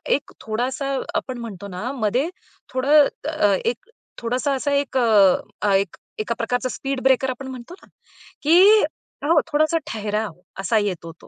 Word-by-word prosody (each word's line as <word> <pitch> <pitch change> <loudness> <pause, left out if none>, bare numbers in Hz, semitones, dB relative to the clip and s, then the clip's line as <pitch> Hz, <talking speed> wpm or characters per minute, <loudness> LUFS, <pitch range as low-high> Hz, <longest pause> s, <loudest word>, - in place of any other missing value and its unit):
एक 285 - -6
थोडासा, 260 +5 -2 0.2
आपण 255 -2 -2
म्हणतो 205 -5 -7
ना, 200 +7 -5
मध्ये 250 +4 0 0.4
थोडं 280 +3 +5 0.2
अ, 210 -11 +2
एक 240 - -2 0.3
थोडासा 255 +4 0
असा 285 +2 -1
ए, 280 - +4
एक 275 -1 -4 0.6
अ, 200 -2 +3 0.4
एका 215 +2 -1
प्रकारचा 245 +2 -1
स्पीड 270 0 -3
ब्रेकर 265 0 +3
आपण 260 +1 -5
म्हणतो 255 +5 -9
ना, - - -19 0.6
की 320 +4 +5 0.7
हो 320 +1 +5
थोडासा 310 +3 +2
ठहराव 215 -2 -2 0.3
असा 220 +3 +1
येतो 180 -5 -3
तो. - - -15
255 Hz, 150 wpm, -22 LUFS, 220-275 Hz, 0.7 s, थोडं